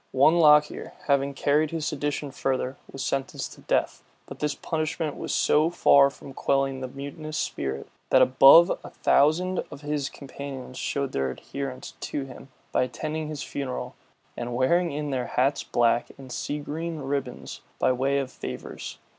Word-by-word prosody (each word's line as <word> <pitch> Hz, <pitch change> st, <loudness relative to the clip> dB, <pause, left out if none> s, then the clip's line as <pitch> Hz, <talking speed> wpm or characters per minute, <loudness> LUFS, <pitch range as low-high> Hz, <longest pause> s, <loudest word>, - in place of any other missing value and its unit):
One 155 Hz, +6 st, +5 dB
Lockier, 150 Hz, -2 st, +4 dB
having 140 Hz, -1 st, +1 dB
carried 150 Hz, +3 st, +2 dB
his 160 Hz, -1 st, -3 dB
sedition 145 Hz, -1 st, -2 dB
further, 130 Hz, -1 st, -1 dB, 0.2 s
was 135 Hz, -, -4 dB
sentenced 135 Hz, -1 st, -3 dB
to -, -, -16 dB
death; -, -, 0 dB, 0.2 s
but -, -, -10 dB
this 150 Hz, -1 st, -1 dB
punishment 155 Hz, -1 st, -2 dB
was -, -, -5 dB
so 155 Hz, +2 st, +3 dB
far 140 Hz, -5 st, +5 dB
from 140 Hz, 0 st, -12 dB
quelling 135 Hz, -1 st, 0 dB
the 130 Hz, -, -3 dB
mutinous 145 Hz, +3 st, -6 dB
spirit, 70 Hz, -, -3 dB, 0.2 s
that -, -, +6 dB
above 135 Hz, +6 st, +7 dB
a -, -, -8 dB
thousand 175 Hz, +6 st, +2 dB
of 145 Hz, -, -10 dB
his 145 Hz, -2 st, -2 dB
companions 135 Hz, -2 st, -8 dB
showed 140 Hz, -1 st, -2 dB
their 65 Hz, -1 st, 0 dB
adherence 130 Hz, -, -6 dB
to 140 Hz, -2 st, -3 dB
him, 135 Hz, 0 st, -12 dB, 0.2 s
by -, -, +2 dB
attending 155 Hz, +5 st, -3 dB
his 150 Hz, -2 st, -5 dB
funeral, 135 Hz, -3 st, -4 dB, 0.4 s
and 120 Hz, 0 st, -4 dB
wearing 170 Hz, +8 st, +2 dB
in 145 Hz, 0 st, -3 dB
their 125 Hz, -3 st, -1 dB
hats 135 Hz, +3 st, +1 dB
black 120 Hz, 0 st, +2 dB
and 130 Hz, -2 st, -11 dB
sea 145 Hz, -, -3 dB
green 160 Hz, +3 st, -4 dB
ribbons 135 Hz, -2 st, -4 dB, 0.2 s
by -, -, +3 dB
way 135 Hz, +2 st, +1 dB
of 135 Hz, -2 st, -2 dB
favors. -, -, -7 dB
140 Hz, 165 wpm, -26 LUFS, 130-150 Hz, 0.4 s, above